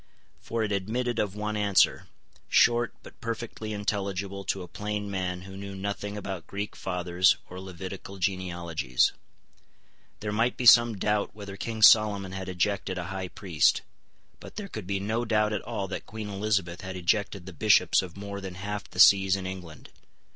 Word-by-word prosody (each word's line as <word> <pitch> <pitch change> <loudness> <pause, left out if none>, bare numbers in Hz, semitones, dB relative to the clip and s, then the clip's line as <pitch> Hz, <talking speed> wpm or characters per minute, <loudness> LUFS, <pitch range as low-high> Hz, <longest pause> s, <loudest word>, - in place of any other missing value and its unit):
For 115 -1 -2
it 105 - -2
admitted 115 +5 -1
of 100 -2 -1
one 105 0 -3
answer, 100 -2 +3 0.4
short, 120 0 +4
but - - -15
perfectly 115 -2 -5
intelligible 100 -2 -3
to 95 - -2
a - - -9
plain 105 +1 -4
man 90 -2 -3
who 95 0 -10
knew 100 0 -7
nothing 100 +1 -4
about 95 -4 -6
Greek 100 +1 -5
fathers 90 0 +2
or 90 - -7
Levitical 95 +1 -8
genealogies. 85 -8 0 1.1
There 105 0 -2
might 115 +4 +1
be 125 - -2
some 120 -2 +8
doubt 105 +1 0
whether 100 -2 -8
King 110 +2 -3
Solomon 105 -4 +6
had 95 0 -5
ejected 95 +1 -1
a 90 - -2
high 95 -1 -3
priest; 90 -5 +1 0.6
but - - -12
there 205 -1 -5
could 110 - -7
be 100 0 -1
no 110 +4 -1
doubt 105 -2 +1
at 105 - -1
all 95 - -4
that - - -5
Queen 110 -1 -6
Elizabeth 100 -4 -1
had 95 0 -6
ejected 100 +1 0
the 95 - -9
Bishops 95 -1 +4
of 95 -1 -9
more 100 0 -6
than 95 -2 -7
half 100 +2 -5
the 90 - -9
sees 95 0 +7
in 95 -1 -5
England. 90 -5 -8
100 Hz, 175 wpm, -28 LUFS, 95-105 Hz, 1.1 s, some